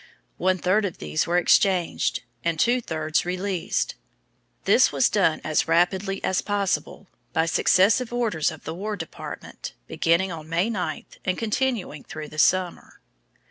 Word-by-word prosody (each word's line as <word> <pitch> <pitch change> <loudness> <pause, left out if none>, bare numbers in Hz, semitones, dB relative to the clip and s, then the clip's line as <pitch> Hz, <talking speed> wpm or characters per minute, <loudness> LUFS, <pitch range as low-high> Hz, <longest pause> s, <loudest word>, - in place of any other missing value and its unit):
One 185 +1 +2
third 185 +4 +2
of 185 - -4
these 155 - -1
were 175 +1 +2
exchanged, 180 -3 +2 0.2
and 165 -2 -1
two 245 +5 +3
thirds 155 -5 -1
released. 185 0 -2 0.7
This - - +5
was - - +2
done - - +2
as - - +1
rapidly 190 +3 +1
as 190 - +1
possible 200 -1 -2 0.3
by 160 - +2
successive 205 +8 +3
orders 225 -11 0
of 160 -2 -10
the 160 - -5
War 210 +5 -4
Department, 165 -4 -8
beginning 170 - +1
on 160 -2 -8
May 175 +7 +1
9 180 -7 -3 0.2
and 185 -1 -1
continuing 225 - -1
through 155 -1 -8
the 155 - -7
summer. 185 +2 +1
185 Hz, 145 wpm, -24 LUFS, 165-200 Hz, 0.7 s, This